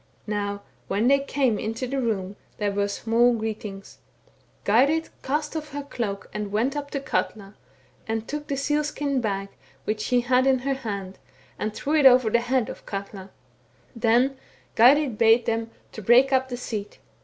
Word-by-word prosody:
" - - -36
Now 205 -1 -3 0.2
when 205 +5 +1
they 275 +1 +5
came 270 -6 0
into 225 +4 -3
the 270 +2 -2
room, 200 -5 -2 0.2
there 205 -1 0
were 200 0 0
smaU 230 +3 +2
greetings. 210 -3 -6 0.7
Geirrid 280 +10 +3
cast 295 +3 -2
ofiF 310 -1 -3
her 290 - -3
the 280 - -21
cloak 200 -4 -4
and 210 -1 -4
went 235 +7 0
up 285 -1 -4
to 280 - -3
Katla, 210 -6 -3 0.5
and 225 0 -2
took 295 0 -5
the 280 -2 -2
seal 295 +2 +1
skin 285 -3 -1
bag 195 -3 -2 0.3
which 215 +5 -2
she 245 +3 +2
had 255 +2 +2
in 265 -1 +4
her 270 +2 -1
hand, 200 -7 -5 0.4
and 215 - -1
drew 275 +8 -3
it 300 -3 +7
over 250 -3 +5
the 235 - +3
head 245 -1 0
of - - -9
Katla.* 195 -1 -6 0.7
Then 245 +4 +2 0.4
Geirrid 255 0 +5
bade 225 +1 +5
them 225 0 -1 0.2
break 240 +6 +4
up 260 0 +2
the 245 - -4
seat. 215 -4 -5
235 Hz, 180 wpm, -25 LUFS, 210-270 Hz, 0.7 s, it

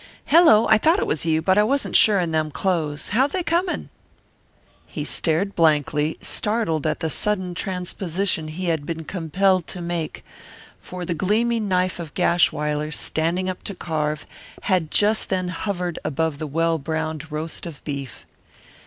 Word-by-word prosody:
"Hello, 290 -9 +6
I 220 -1 +5
thought 325 - +4
it - - 0
was 155 +2 -1
you, 160 0 +2
but 190 +3 +4
I - - +6
wasn't 275 +6 0
sure 210 -2 +6
in 175 -3 0
them 155 -1 0
clothes. 155 -3 -1
How 250 +7 +3
they 360 +5 -2
coming?" 345 +2 -1 1.0
He - - -5
stared 180 +5 -1
blankly, 150 -1 +2
startled 210 -8 0
at 155 - -2
the 160 - 0
sudden 185 -2 -1
transposition 180 -1 -2
he 170 +4 -5
had 160 -4 0
been 165 -1 -4
compelled 185 +2 +1
to 185 - -7
make, 170 -2 -4 0.5
for 180 -1 -7
the 170 - -1
gleaming 215 +6 +1
knife 185 -1 0
of 165 -3 -7
Gashwiler, 150 -3 +1
standing 170 +4 -1
up 185 -1 -4
to 200 - -7
carve, 150 -3 -2 0.4
had 180 -5 +1
just 210 +5 +2
then 185 -2 -1
hovered 180 -1 -3
above 155 0 -1
the 155 - -3
well 165 +2 +1
browned 160 +1 -4
roast 155 +3 -4
of 155 -5 -10
beef. 140 -3 -6
170 Hz, 160 wpm, -23 LUFS, 155-195 Hz, 1.0 s, Hello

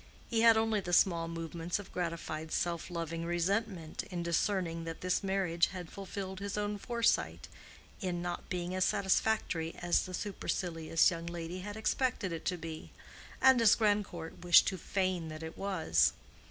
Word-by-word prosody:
He 225 -1 +2
had 230 -1 +7
only 220 -1 +2
the 175 -2 -4
small 170 -2 +4
movements 165 +1 -3
of 205 -2 -9
gratified 165 -2 -3
self 170 -1 -1
loving 165 -1 -3
resentment 175 0 -1
in 175 -3 -3
discerning 170 0 0
that 165 0 -6
this 180 0 +1
marriage 190 -3 +1
had 180 -3 -8
fulfilled 190 -1 -6
his 200 +1 -4
own 205 0 -2
foresight 235 +1 0 0.5
in 180 -3 -1
not 175 0 -4
being 180 0 -3
as 185 0 +1
satisfactory 190 -4 +1
as 175 +2 +1
the 185 - -4
supercilious 165 -5 0
young 170 -1 -5
lady 170 +1 -5
had 205 +3 -6
expected 220 -3 0
it 165 -1 -5
to 180 - 0
be, 160 -1 -7 0.5
and 265 -2 +6
as 225 -3 +7
Grandcourt 205 -7 -1
wished 175 -1 +7
to 190 - -5
feign 185 -2 -1
that 155 0 -7
it 160 - -7
was. 165 - +2
180 Hz, 165 wpm, -32 LUFS, 165-200 Hz, 0.5 s, had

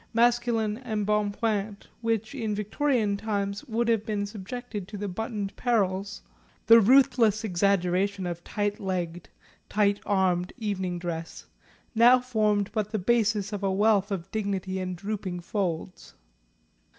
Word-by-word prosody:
Masculine 230 -2 +2
embonpoint, 210 -2 -1 0.2
which, 225 0 -1
in 220 -6 -2
Victorian 210 0 0
times, 200 -1 -2
would 235 0 -1
have 225 -3 +2
been 210 -2 -2
subjected 210 0 -6
to 210 - -7
the 205 +1 -3
buttoned 205 +1 -4
perils, 200 -5 0 0.4
the 230 0 +8
ruthless 230 -2 +4
exaggeration 195 0 +1
of 175 -1 -4
tight 205 0 -2
legged 180 -4 -3 0.4
tight 205 -1 +2
armed 185 -3 +1
evening 190 -6 -2
dress, 165 -2 -5 0.5
now 240 +2 +6
formed 215 -5 0
but 210 -2 -1
the 215 - 0
basis 215 0 +1
of 205 - -3
a 195 -1 +1
wealth 205 0 +3
of 195 -2 -4
dignity 195 -3 -2
and 185 -1 -3
drooping 195 -1 -4
folds. 180 -1 -4
205 Hz, 130 wpm, -27 LUFS, 190-225 Hz, 0.5 s, the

